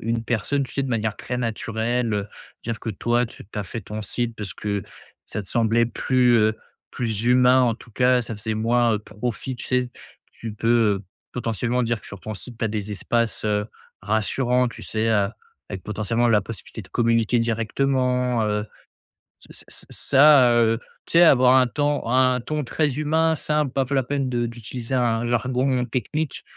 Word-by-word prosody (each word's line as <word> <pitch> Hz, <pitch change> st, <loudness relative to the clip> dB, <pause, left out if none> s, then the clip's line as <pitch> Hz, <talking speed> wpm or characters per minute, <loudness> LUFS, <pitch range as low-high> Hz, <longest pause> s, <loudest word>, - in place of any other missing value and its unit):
une 115 Hz, +1 st, -1 dB
personne 120 Hz, +5 st, -1 dB
tu 130 Hz, -, -6 dB
sais 140 Hz, -, -1 dB
de -, -, -4 dB
manière 110 Hz, -3 st, -1 dB
très 125 Hz, -, -4 dB
naturelle, 115 Hz, 0 st, -1 dB
heu, 100 Hz, -1 st, -2 dB, 0.4 s
dire 115 Hz, -1 st, -4 dB
que -, -, -7 dB
toi 120 Hz, +4 st, 0 dB
tu -, -, -13 dB
tu 105 Hz, +2 st, -8 dB
as 105 Hz, -, -2 dB
fait 115 Hz, -, -6 dB
ton 105 Hz, +2 st, -6 dB
site 115 Hz, +3 st, -3 dB
parce 100 Hz, -4 st, -6 dB
que 100 Hz, -2 st, -3 dB, 0.4 s
ça 105 Hz, -, -4 dB
te 95 Hz, -, -11 dB
semblait 115 Hz, 0 st, +2 dB
plus, 125 Hz, 0 st, +2 dB
heu, 110 Hz, 0 st, +2 dB, 0.4 s
plus 110 Hz, -2 st, -2 dB
humain 125 Hz, +1 st, +5 dB
en 115 Hz, -3 st, +2 dB
tout 115 Hz, -, -16 dB
cas, 125 Hz, +2 st, +3 dB
ça 115 Hz, -1 st, -6 dB
faisait 110 Hz, +1 st, -3 dB
moins, 115 Hz, +2 st, +2 dB
heu, -, -, -1 dB
profit, 120 Hz, +4 st, -5 dB
tu -, -, -8 dB
sais? 125 Hz, -1 st, 0 dB, 0.4 s
Tu 115 Hz, -2 st, -7 dB
peux, 110 Hz, -3 st, +2 dB, 0.3 s
potentiellement 120 Hz, +1 st, -1 dB
dire 115 Hz, -2 st, -1 dB
que -, -, -15 dB
sur 100 Hz, -2 st, -10 dB
ton 110 Hz, -, -6 dB
site 120 Hz, +4 st, -10 dB
tu -, -, -1 dB
as 110 Hz, -, +1 dB
des 105 Hz, -1 st, -4 dB
espaces, 115 Hz, +2 st, -1 dB
heu, 105 Hz, -1 st, 0 dB, 0.4 s
rassurants 120 Hz, +5 st, +1 dB
tu -, -, -10 dB
sais, 110 Hz, +1 st, -1 dB
heu, 105 Hz, -3 st, +2 dB, 0.4 s
avec 95 Hz, -3 st, -6 dB
potentiellement 110 Hz, +3 st, 0 dB
la 110 Hz, -3 st, +4 dB
possibilité 110 Hz, +1 st, -8 dB
de 95 Hz, -, -17 dB
communiquer 115 Hz, 0 st, +2 dB
directement, 125 Hz, +1 st, 0 dB
heu, 105 Hz, 0 st, -1 dB, 0.8 s
ç -, -, -12 dB
ç -, -, -11 dB
ça, 140 Hz, -3 st, +5 dB
heu, 115 Hz, -1 st, +3 dB, 0.3 s
tu -, -, -10 dB
sais 170 Hz, -, +7 dB
avoir 130 Hz, -5 st, +6 dB
un 130 Hz, -1 st, +6 dB
temps 145 Hz, +3 st, 0 dB
un 130 Hz, -1 st, +3 dB
ton 150 Hz, +4 st, -3 dB
très 145 Hz, +1 st, -1 dB
humain, 160 Hz, +2 st, +2 dB
simple 150 Hz, -3 st, -1 dB
pas 135 Hz, -1 st, 0 dB
la 135 Hz, -, +2 dB
peine 135 Hz, +1 st, -2 dB
de 120 Hz, -1 st, 0 dB
d'utiliser 120 Hz, +2 st, -6 dB
un 120 Hz, -2 st, +1 dB
jargon 125 Hz, +2 st, +1 dB
technique, 140 Hz, +5 st, -3 dB
120 Hz, 190 wpm, -23 LUFS, 110-125 Hz, 0.8 s, sais